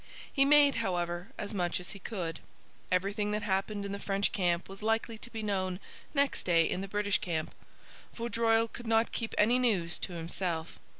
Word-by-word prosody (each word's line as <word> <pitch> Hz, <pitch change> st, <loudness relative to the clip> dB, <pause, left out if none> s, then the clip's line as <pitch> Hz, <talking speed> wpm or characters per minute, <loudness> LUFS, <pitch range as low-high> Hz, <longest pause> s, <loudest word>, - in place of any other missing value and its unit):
He 275 Hz, -1 st, +5 dB
made, 285 Hz, -1 st, +6 dB
however, 175 Hz, -4 st, -1 dB
as 205 Hz, -, -5 dB
much 180 Hz, -3 st, 0 dB
as 180 Hz, -, -5 dB
he 200 Hz, -, -8 dB
could. 175 Hz, -6 st, -4 dB, 0.5 s
Everything 200 Hz, +3 st, +1 dB
that 210 Hz, 0 st, -1 dB
happened 200 Hz, +1 st, -1 dB
in 200 Hz, -, -4 dB
the 200 Hz, -, -4 dB
French 200 Hz, 0 st, 0 dB
camp 175 Hz, -4 st, +1 dB
was 195 Hz, +1 st, -10 dB
likely 225 Hz, +1 st, 0 dB
to 240 Hz, -, -9 dB
be 225 Hz, -2 st, -5 dB
known 185 Hz, -3 st, -1 dB, 0.4 s
next 280 Hz, 0 st, +2 dB
day 170 Hz, -2 st, +4 dB
in 185 Hz, -, -1 dB
the 195 Hz, -, -4 dB
British 205 Hz, 0 st, +1 dB
camp. 160 Hz, -3 st, -2 dB, 0.6 s
Vaudreuil 230 Hz, -1 st, +2 dB
could 240 Hz, +1 st, -9 dB
not 225 Hz, 0 st, +3 dB
keep 225 Hz, -2 st, -3 dB
any 235 Hz, +4 st, +5 dB
news 190 Hz, -9 st, +1 dB
to 185 Hz, -, -3 dB
himself. 170 Hz, 0 st, -3 dB
200 Hz, 185 wpm, -31 LUFS, 180-225 Hz, 0.6 s, made